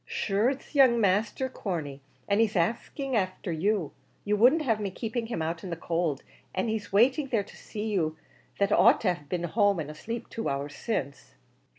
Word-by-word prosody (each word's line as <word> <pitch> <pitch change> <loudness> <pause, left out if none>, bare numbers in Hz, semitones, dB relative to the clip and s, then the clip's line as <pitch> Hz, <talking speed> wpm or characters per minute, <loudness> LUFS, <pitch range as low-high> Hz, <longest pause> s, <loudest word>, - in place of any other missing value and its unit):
"Shure 205 +4 +1
it's 275 0 -6
the 295 - -5
young 245 -3 +6
masther, 210 +5 +1
Corney, 160 - -4 0.3
and 205 +2 +3
he 225 - +4
axing 240 - -1
afther 185 -3 -1
you; 180 0 0 0.3
you 210 0 +2
wouldn't 255 +9 +5
have 225 -6 +1
me 205 -2 -2
keeping 225 +4 -4
him 170 -9 -2
out 165 +1 -3
in 190 - -5
the 170 - -2
cowld, 165 -3 -1 0.3
and 190 +4 0
he 220 -1 -1
waiting 260 +8 +4
there 230 -6 +1
to - - -15
see 210 -1 -6
you 160 -6 0 0.4
that 200 0 +1
ought - - +6
to 185 -5 +2
have 150 -5 -13
been 175 -1 -2
at 170 - -3
home 205 -3 +3
and 150 -1 -4
asleep 230 +9 -6
two 225 - -3
hours 140 +1 -3
since." 140 - -4
205 Hz, 205 wpm, -28 LUFS, 170-230 Hz, 0.4 s, young